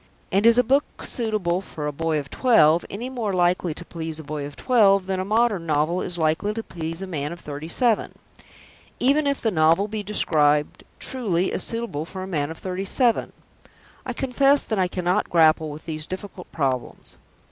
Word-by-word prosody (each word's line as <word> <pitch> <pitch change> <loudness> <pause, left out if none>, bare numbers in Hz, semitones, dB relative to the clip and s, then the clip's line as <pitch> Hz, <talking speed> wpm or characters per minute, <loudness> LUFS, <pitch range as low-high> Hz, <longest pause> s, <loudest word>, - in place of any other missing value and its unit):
And 200 +4 +3
is 230 0 +6
a 250 - +5
book 275 +5 0
"suitable 210 -7 -1
for 155 -5 -7
a 150 - -1
boy 160 +1 -1
of 140 -2 -5
twelve" 170 -10 +4
any 225 +6 -5
more 235 -6 -3
likely 175 -2 +1
to 175 - -9
please 160 -2 -6
a - - -7
boy 145 -1 -5
of 145 - -12
twelve 200 -6 +3
than 190 0 -2
a - - -1
modern 210 -4 +1
novel 155 +4 +1
is 175 - -3
likely 165 +6 0
to 225 - -3
please 165 0 -6
a - - -3
man 150 -5 -4
of 170 - -8
thirty 150 0 -7
seven; 225 +5 +1 0.8
even 285 +3 +3
if 280 -1 0
the 225 - +2
novel 165 +3 +3
be 215 0 -4
described 150 -7 +1
truly 190 -9 -1
as - - 0
"suitable 230 -10 -3
for 185 +2 -7
a - - -6
man 150 -6 -1
of 160 - -7
thirty 185 0 -4
seven"? 235 +4 +1 0.7
I 255 - -4
confess 275 +3 +2
that 220 -3 -2
I 185 - +2
cannot 180 +2 -1
grapple 160 -2 +4
with 150 +1 -9
these 155 -1 -5
difficult 185 -1 -8
problems. 130 -5 -3
180 Hz, 195 wpm, -23 LUFS, 160-220 Hz, 0.8 s, is